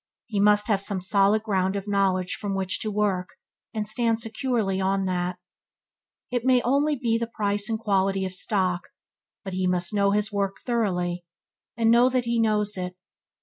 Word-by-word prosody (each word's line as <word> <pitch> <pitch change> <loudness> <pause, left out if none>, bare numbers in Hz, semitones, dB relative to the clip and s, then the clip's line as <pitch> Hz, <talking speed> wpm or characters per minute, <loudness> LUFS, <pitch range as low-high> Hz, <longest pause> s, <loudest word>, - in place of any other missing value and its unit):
He 215 -4 -3
must 210 0 +4
have 205 -4 +2
some 200 -1 -2
solid 200 +3 +2
ground 190 -3 0
of 200 0 -4
knowledge 190 -2 +1
from 200 -2 -3
which 190 -1 0
to 215 - -2
work, 200 -3 0 0.4
and 215 -2 -3
stand 225 +1 +2
securely 225 -4 -1
on 195 0 +1
that. 180 -1 -2 0.9
It 245 -2 -1
may 260 0 +4
be 245 - 0
only 285 +4 +2
the 230 -3 -1
price 205 0 -1
and 225 - 0
quality 195 -3 0
of 185 - -5
stock, 185 -2 0 0.5
but 190 -2 -6
he 185 0 0
must 180 +1 -1
know 200 -1 +3
his 210 +1 +1
work 200 -1 -1
thoroughly, 180 -7 -1 0.5
and 225 -1 +3
know 240 +2 +5
that 255 -1 0
he 235 0 0
knows 210 -2 +1
it. 180 0 -4
205 Hz, 180 wpm, -25 LUFS, 190-225 Hz, 0.9 s, know